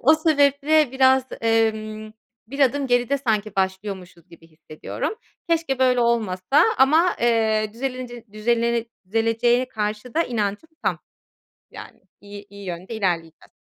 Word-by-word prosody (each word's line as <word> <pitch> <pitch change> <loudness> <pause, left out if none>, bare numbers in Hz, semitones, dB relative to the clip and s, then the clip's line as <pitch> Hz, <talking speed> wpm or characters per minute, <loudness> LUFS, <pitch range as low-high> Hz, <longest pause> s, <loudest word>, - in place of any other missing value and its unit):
O 310 +6 +6
sebeple 300 -2 +2
biraz, 265 0 +4 0.2
emm, 215 -1 0 0.3
bir 275 +4 -7
adım 275 +1 +2
geride 245 +2 +1
sanki 215 -5 -1
başlıyormuşuz 190 -2 -4
gibi 170 -1 -17
hissediyorum. 155 - -6 0.3
Keşke 325 -6 0
böyle 255 -1 +3
olmasa 230 +1 +2 0.2
ama, 315 +7 +4
eee, 220 -2 +1
düzelinici 250 -1 -6
düzelene 235 +1 0 0.2
düzeleneceğine 230 +4 +1
karşı 215 +1 -4
da 330 - +3
inancım 215 +5 -3
tam. - - 0 0.7
Yani, - - -12 0.2
iyi 205 0 -11
iyi 200 0 -11
yönde 180 +4 -6
ilerleyeceğiz. 170 -6 -3
230 Hz, 125 wpm, -22 LUFS, 205-265 Hz, 0.7 s, O